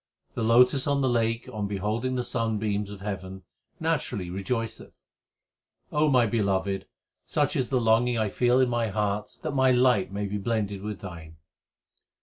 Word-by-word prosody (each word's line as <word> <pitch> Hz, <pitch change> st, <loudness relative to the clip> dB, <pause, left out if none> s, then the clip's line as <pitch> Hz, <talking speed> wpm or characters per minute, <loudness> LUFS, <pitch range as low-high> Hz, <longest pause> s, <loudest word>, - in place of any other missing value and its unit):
The -, -, -4 dB
lotus 125 Hz, +4 st, +4 dB
on 140 Hz, -1 st, +2 dB
the 135 Hz, -, +2 dB
lake 115 Hz, -1 st, 0 dB
on 105 Hz, -1 st, -2 dB
beholding 105 Hz, +6 st, -2 dB
the 125 Hz, -, -1 dB
sunbeams 110 Hz, -4 st, -1 dB
of 100 Hz, -1 st, -9 dB
heaven 95 Hz, -2 st, -6 dB, 0.4 s
naturally 135 Hz, -, -1 dB
rejoiceth: 115 Hz, +4 st, -4 dB, 0.9 s
O 150 Hz, +1 st, +2 dB
my 125 Hz, -3 st, +4 dB
Beloved, 100 Hz, -3 st, 0 dB, 0.4 s
such -, -, 0 dB
is 125 Hz, -, 0 dB
the 130 Hz, -, +2 dB
longing 115 Hz, +1 st, +3 dB
I 110 Hz, -2 st, +1 dB
feel 125 Hz, +5 st, +2 dB
in 130 Hz, -, +4 dB
my 120 Hz, -1 st, 0 dB
heart 105 Hz, 0 st, -2 dB
that 155 Hz, -, -2 dB
my 130 Hz, -1 st, +3 dB
light 125 Hz, -6 st, +3 dB
may 100 Hz, +1 st, -3 dB
be 100 Hz, +1 st, -3 dB
blended 100 Hz, -2 st, -2 dB
with 105 Hz, -3 st, -5 dB
Thine. 85 Hz, -4 st, -9 dB
110 Hz, 160 wpm, -27 LUFS, 100-125 Hz, 0.9 s, lotus